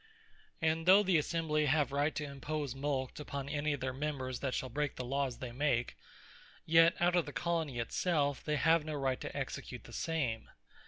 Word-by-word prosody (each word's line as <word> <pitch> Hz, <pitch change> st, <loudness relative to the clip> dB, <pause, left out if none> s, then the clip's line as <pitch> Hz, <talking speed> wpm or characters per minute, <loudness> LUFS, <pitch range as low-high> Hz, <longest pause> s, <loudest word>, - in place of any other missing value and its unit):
And 160 Hz, +1 st, +1 dB
though 195 Hz, +3 st, +8 dB
the 185 Hz, -4 st, +4 dB
Assembly 155 Hz, -1 st, 0 dB
have 145 Hz, -1 st, +2 dB
right, 145 Hz, +2 st, +1 dB
to 150 Hz, -, -2 dB
impose 145 Hz, 0 st, -4 dB
a -, -, -12 dB
Mulct 135 Hz, -1 st, -2 dB
upon 140 Hz, -2 st, -5 dB
any 145 Hz, +1 st, -1 dB
of 145 Hz, -2 st, -3 dB
their 130 Hz, 0 st, -2 dB
members, 130 Hz, -2 st, -3 dB
that 130 Hz, -2 st, -2 dB
shall 130 Hz, -, -2 dB
break 145 Hz, +1 st, -2 dB
the 125 Hz, -, -4 dB
Lawes 135 Hz, -1 st, -1 dB
they 125 Hz, -2 st, -6 dB
make; 125 Hz, -2 st, 0 dB, 0.7 s
yet 165 Hz, +2 st, +6 dB
out 175 Hz, +1 st, +3 dB
of 175 Hz, -3 st, +2 dB
the -, -, -5 dB
Colonie 165 Hz, -5 st, -1 dB
it 115 Hz, -, -3 dB
selfe, 145 Hz, -6 st, +1 dB
they 150 Hz, -, 0 dB
have 160 Hz, +2 st, +4 dB
no 155 Hz, 0 st, -4 dB
right 135 Hz, -2 st, -1 dB
to -, -, -5 dB
execute -, -, -5 dB
the -, -, -13 dB
same. 135 Hz, -9 st, -2 dB
145 Hz, 205 wpm, -33 LUFS, 135-160 Hz, 0.7 s, though